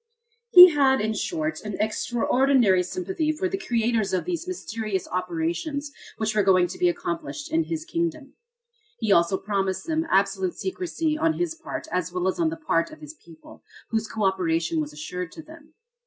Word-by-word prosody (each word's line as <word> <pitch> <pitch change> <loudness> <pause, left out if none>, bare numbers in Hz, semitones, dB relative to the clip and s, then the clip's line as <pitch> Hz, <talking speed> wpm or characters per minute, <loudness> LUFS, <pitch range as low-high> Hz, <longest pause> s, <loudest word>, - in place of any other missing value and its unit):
He 360 -3 +11
had 275 -3 +3
in 220 +1 0
short 310 - -3
an 210 -2 -5
extraordinary 240 -1 +2
sympathy 335 - -2
for 315 +5 -2
the 385 - -2
creators 230 - 0
of 185 - 0
these 350 -1 -3
mysterious 215 - -4
operations 180 - -3 0.3
which 215 -1 -1
were 215 - +3
going 185 -2 +4
to - - -8
be 180 - +4
accomplished 175 - -4
in 325 0 +1
his 320 -1 -4
kingdom. 330 -4 -3 0.6
He 220 -3 -1
also 170 +1 +4
promised 195 -2 -2
them 320 0 -1
absolute 195 -2 +1
secrecy 335 -4 -2
on 320 0 +2
his 350 -1 -2
part 325 0 -7
as 180 -1 -1
well 180 +1 -1
as 190 - -1
on 330 -2 +2
the 325 - -5
part 305 - 0
of 310 - -13
his 300 0 -10
people, 165 - -16 0.3
whose 220 -1 0
co 220 -1 -4
operation 165 -4 +1
was 150 -1 -5
assured 165 +4 -6
to 320 - -10
them. 315 0 -16
230 Hz, 180 wpm, -25 LUFS, -, 0.6 s, He